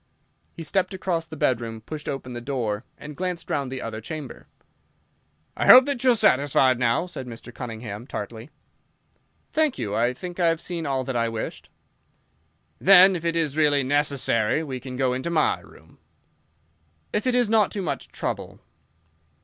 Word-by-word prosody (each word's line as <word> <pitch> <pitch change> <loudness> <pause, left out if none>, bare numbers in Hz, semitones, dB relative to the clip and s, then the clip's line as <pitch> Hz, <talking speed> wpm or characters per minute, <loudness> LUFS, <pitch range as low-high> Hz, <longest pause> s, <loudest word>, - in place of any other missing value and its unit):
He 165 - -7
stepped 190 +3 0
across 170 -3 -2
the 160 - -9
bedroom, 115 -4 -1
pushed 150 +6 -7
open 130 -2 -5
the 120 - -6
door, 120 -5 -2
and 150 0 -9
glanced 180 0 -4
round 140 -3 -1
the 130 -1 -5
other 110 -1 -5
chamber. 155 +5 -8 1.1
"I - - -1
hope 255 0 +10
that 280 -4 -2
you 260 - +5
are - - -1
satisfied 130 - +3
now?" 120 +6 +2
said 155 -8 -8
Mr. 120 0 -10
Cunningham, 115 -2 -7
tartly. 115 +4 -6 1.0
"Thank 310 -3 +2
you, 105 -5 -3
I 120 +3 +1
think 180 +5 -8
I 175 - +3
have 165 -1 +1
seen 170 -3 -4
all 135 -1 0
that 130 0 -4
I 115 -1 +1
wished." 115 -1 -6 1.1
"Then 190 0 +7
if 170 - -5
it 170 0 0
is 155 -4 0
really 145 -3 +3
necessary 140 -2 +1
we 130 -4 -5
can 125 -1 -8
go 130 -1 +1
into 130 +6 -3
my 155 -3 +2
room." - - -19 1.1
"If 220 - 0
it 250 - +2
is 245 -2 +3
not 215 -1 +3
too 200 - -4
much 170 - -3
trouble." - - -5
140 Hz, 175 wpm, -24 LUFS, 120-170 Hz, 1.1 s, hope